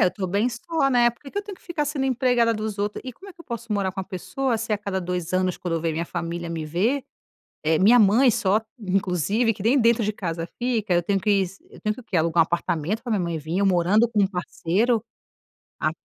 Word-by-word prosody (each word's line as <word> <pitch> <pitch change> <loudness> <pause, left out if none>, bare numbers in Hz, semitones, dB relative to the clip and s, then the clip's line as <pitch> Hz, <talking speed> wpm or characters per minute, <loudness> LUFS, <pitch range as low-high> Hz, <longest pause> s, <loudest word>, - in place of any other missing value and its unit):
É, - - +6
eu - - +2
tô 195 -3 -3
bem 200 +6 +1
só, 275 +5 -1
né. 240 -2 +5
Por 235 - -22
que 275 - -10
que 405 - -3
eu 405 - -2
tenho 400 -2 -9
que - - -26
ficar 340 -4 -2
sendo 290 -2 -2
empregada 245 -2 +2
dos 215 -1 -4
outros 205 +1 -2
e 255 - -6
como 390 +11 -14
é - - -13
eu 335 - -12
posso 235 -2 -5
morar 195 -3 0
com 190 - -4
uma 190 - -7
pessoa 245 +6 -2
se 225 0 -3
a 210 - +1
cada 200 -2 -3
2 180 -1 -3
anos, 185 -1 +1
quando 165 -2 -2
vem 165 0 -1
minha 165 +2 -2
família 170 0 -4
me 165 -2 -3
ver, 210 - 0 0.6
eh, 155 0 +2
minha 230 +6 +6
mãe 225 +5 +5
só 205 +1 +2 0.2
inclusive, 195 +3 +1
que 195 - -9
nem 250 +6 +4
dentro 230 -1 +3
de 210 - -1
casa 165 -4 -4
fica, 230 -6 0
eu 175 -1 +2
tenho 195 +2 +1
que 200 -1 +2 0.2
eu - - -14
tenho 215 0 -1
que - - -10
o - - -20
quê? 200 -6 -2
Alugar 165 +1 +3
1 160 - +4
apartamento 170 +4 -2
pra 245 - -4
minha 205 -4 +1
mãe 170 -1 -2
vim 160 +4 -3
eu 200 - +3
morando 190 +5 +3
com 215 -3 +2
1 - - +3
parceiro, 200 +5 0 0.8
a - - 0
205 Hz, 260 wpm, -24 LUFS, 180-235 Hz, 0.8 s, É